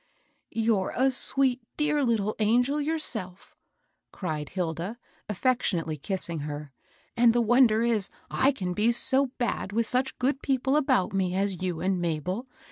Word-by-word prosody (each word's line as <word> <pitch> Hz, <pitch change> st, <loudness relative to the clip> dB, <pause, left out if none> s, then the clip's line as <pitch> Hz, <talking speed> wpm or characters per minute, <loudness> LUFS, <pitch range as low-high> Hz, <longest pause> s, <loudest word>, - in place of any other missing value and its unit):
"You're 220 Hz, -4 st, 0 dB
a 265 Hz, +2 st, +3 dB
sweet, 260 Hz, 0 st, +1 dB, 0.2 s
dear 300 Hz, -1 st, +1 dB
litde 215 Hz, -4 st, +1 dB
angel 245 Hz, +7 st, +2 dB
yourself 285 Hz, -, -2 dB, 0.6 s
1" -, -, -19 dB
cried 155 Hz, -6 st, -3 dB
Hilda, 180 Hz, +4 st, -3 dB, 0.3 s
affectionately 195 Hz, -8 st, 0 dB
kissing 170 Hz, +1 st, -3 dB
her; 145 Hz, -1 st, -6 dB, 0.2 s
" -, -, -35 dB
and 235 Hz, -1 st, +5 dB
the 240 Hz, -, +2 dB
wonder 230 Hz, -1 st, +4 dB
is 225 Hz, -5 st, 0 dB, 0.2 s
I 270 Hz, -, +3 dB
can 185 Hz, -9 st, -4 dB
be 215 Hz, +5 st, +2 dB
so 265 Hz, +3 st, +3 dB
bad 240 Hz, -5 st, -2 dB
with 230 Hz, +2 st, +1 dB
such 255 Hz, +3 st, 0 dB
good 265 Hz, +2 st, 0 dB
people 265 Hz, 0 st, +1 dB
about 265 Hz, -12 st, +2 dB
me 185 Hz, -2 st, 0 dB
as 195 Hz, -2 st, -1 dB
you 180 Hz, -3 st, -2 dB
and 185 Hz, -1 st, 0 dB
Mabel. 175 Hz, -, -2 dB
220 Hz, 155 wpm, -27 LUFS, 185-255 Hz, 0.6 s, and